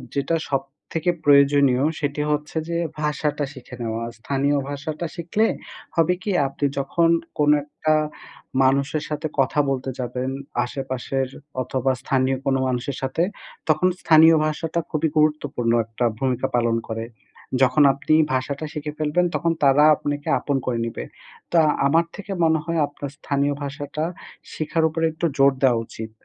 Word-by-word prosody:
যেটা 140 +4 +1
সবথেকে 140 +5 -2
প্রয়োজনীয়, 140 -2 +5 0.2
সেটি 145 +1 -2
হচ্ছে 150 +2 -2
যে 170 - -1 0.2
ভাষাটা 150 -1 -1
শিখে 130 -2 -11
নেওয়া। 115 0 -3 0.2
স্থানীয় 140 +4 0
ভাষাটা 155 +3 -4
শিখলে 180 +6 +1 0.5
হবে 165 +1 +3
কি? 205 - -1 0.2
আপনি 140 +1 -3
যখন 165 +5 +2 0.3
কোনো 150 0 +5
একটা 155 +1 -1 0.7
মানুষের 140 +3 +1
সাথে 150 +1 -2
কথা 135 +2 +2
বলতে 135 -1 -2
যাবেন, 125 +1 -3 0.4
আশেপাশের 130 0 -3 0.4
অথবা 130 +1 0
স্থানীয় 130 -1 +1
কোনো 135 -1 +2
মানুষের 130 +1 -2
সাথে, 135 +5 0 0.5
তখন 155 +4 +4
স্থানীয় 160 0 +7
ভাষাটা 160 +2 -2
খুবই 155 +1 +1
গুরুত্বপূর্ণ 150 -6 +1
একটা 115 +2 -2
ভূমিকা 130 -2 0
পালন 115 -1 +2
করে। 115 0 -3 0.6
যখন 140 +3 +5
আপনি 140 +3 -1 0.2
ভাষাটা 135 +4 -2
শিখে 150 -1 -4
ফেলবেন, 155 +4 +2
তখন 170 - +1
তারা 140 +1 +6
আপনাকে 145 0 -3
আপন 140 -2 -1
করে 120 -2 -1
নিবে। 115 - -5 0.5
তো 175 - +3 0.3
আমার 165 +3 +3
থেকে 200 -1 -8
মনে 160 -1 +3
হয় 165 -1 -1
আপনার 145 -1 -7
স্থানীয় 145 -1 0
ভাষাটা 145 +2 -4 0.5
শিখার 160 +1 -1
উপরে 165 +1 -1
একটু 160 +2 -3
জোর 135 0 +6
দেওয়া 125 -3 +4
উচিত। 110 0 -8
145 Hz, 145 wpm, -23 LUFS, 130-155 Hz, 0.7 s, স্থানীয়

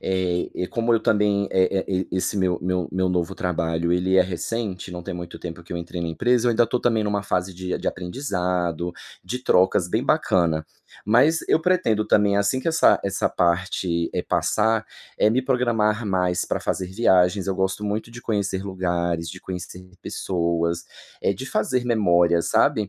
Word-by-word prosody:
eh, 90 -1 -1
como 115 0 +1
eu 115 - +3
também 105 -2 +2
eh 95 +1 +2
eh, 95 -1 -1
esse 95 +3 -1
meu 90 -2 +1
meu 90 -1 -1
meu 95 0 +1
novo 90 -2 -1
trabalho 85 -1 -1
ele 95 +1 +2
é - - +7
recente, 95 +1 -4
não 90 - -6
tem 95 +1 -5
muito 85 -1 -7
tempo 85 0 -7
que 85 - -10
eu - - -2
entrei 85 +1 -6
na 85 - -2
empresa. 120 +8 +1
Eu - - +3
ainda 115 0 +3
tô 125 - 0
também 115 -3 +1
numa 100 -1 -1
fase 90 -1 -2
de 90 0 -3
de - - -1
aprendizado, 90 - -2 0.3
de 120 +7 -3
trocas, 90 -2 +3
bem - - 0
bacana. 80 -4 +1 0.4
Mas 130 +10 +4
eu 160 - +4
pretendo 160 - +2
também, 100 -1 +3
assim 100 +6 +1
que 165 - -1
essa 160 0 +4
essa 100 0 0
parte, 85 -1 0
eh, - - -1
passar, 110 +1 +1 0.3
eh 105 - +4
me 130 +3 +2
programar 115 -4 +1
mais 90 -2 0
pra - - -2
fazer 95 - -2
viagens. 95 -2 +2
Eu 95 - 0
gosto 95 +2 -1
muito 105 +2 -2
de 120 - -10
conhecer 100 -3 -1
lugares, 85 -3 -2
de 95 - -10
conhecer 90 -1 -7 0.2
pessoas. 85 -1 -1 0.4
Eh, - - +2
de - - -7
fazer 125 -1 0
memória, 85 -7 +3
sabe. 105 +4 +2
95 Hz, 180 wpm, -23 LUFS, 90-110 Hz, 0.4 s, é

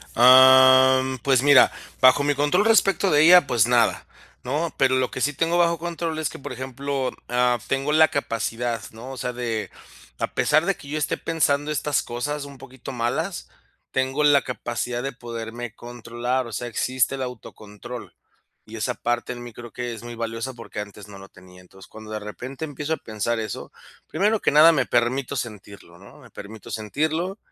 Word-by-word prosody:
Am, 130 +1 +7
pues 130 +1 +2
mira, 145 -1 +6 0.3
bajo 130 +2 +6
mi 145 0 +2
control 150 +8 +2
respecto 195 -4 +3
de 150 0 +5
ella, 175 0 +7
pues 120 -3 +2
nada, 120 -1 +2 0.4
¿no? 150 +5 -2
Pero 130 -1 +3
lo 130 -1 0
que 130 - -6
sí 145 - +1
tengo 165 +4 0
bajo 170 -1 +2
control, 165 -1 -4
es 155 -3 -1
que, - - -10
por 135 - -7
ejemplo, 135 +1 -4 0.2
am, 125 0 +1
tengo 135 +2 -1
la 155 +1 +6
capacidad, 115 -3 -3
¿no? 120 +4 -10
O 135 - -8
sea, 125 0 -4
de 115 -3 -3 0.5
a - - -3
pesar 155 +2 +2
de 195 - +1
que 140 - -14
yo 150 +2 -3
esté 150 - -1
pensando 145 -3 0
estas 150 -1 0
cosas, 145 +5 -4
un 140 -1 -12
poquito 130 0 -10
malas, 130 +9 -3 0.4
tengo 130 +3 0
la 145 -2 +5
capacidad 120 0 -4
de 135 - -3
poderme 115 -1 -7
controlar. 120 +1 -4
O - - -10
sea, 120 +3 -4
existe 130 +3 0
el 135 - -6
autocontrol. 120 -1 -9 0.5
Y 110 - -11
esa 110 -2 -2
parte 120 +1 -2
en 120 -1 -7
mi, 120 -1 -10
creo 120 +1 -11
que 120 +1 -5
es 115 - -10
muy 120 0 -8
valiosa, 115 +2 -4
porque 115 -3 -9
antes 105 0 -11
no 100 -1 -12
lo 95 0 -13
tenía. 90 0 -17
Entonces, 95 +1 -17
cuando 110 0 -12
de 110 - -3
repente, 125 +8 -7
empiezo 145 +1 -4
a - - -2
pensar 110 +2 -3
eso, 110 -2 -6 0.4
primero 210 +2 0
que - - +2
nada, 155 +3 +7
me 135 -5 +1
permito 125 +3 0
sentirlo, 100 -6 -8
¿no?, 100 - -16
me - - -16
permito 105 +1 -11
sentirlo. 155 - -2
130 Hz, 190 wpm, -23 LUFS, 115-145 Hz, 0.5 s, Am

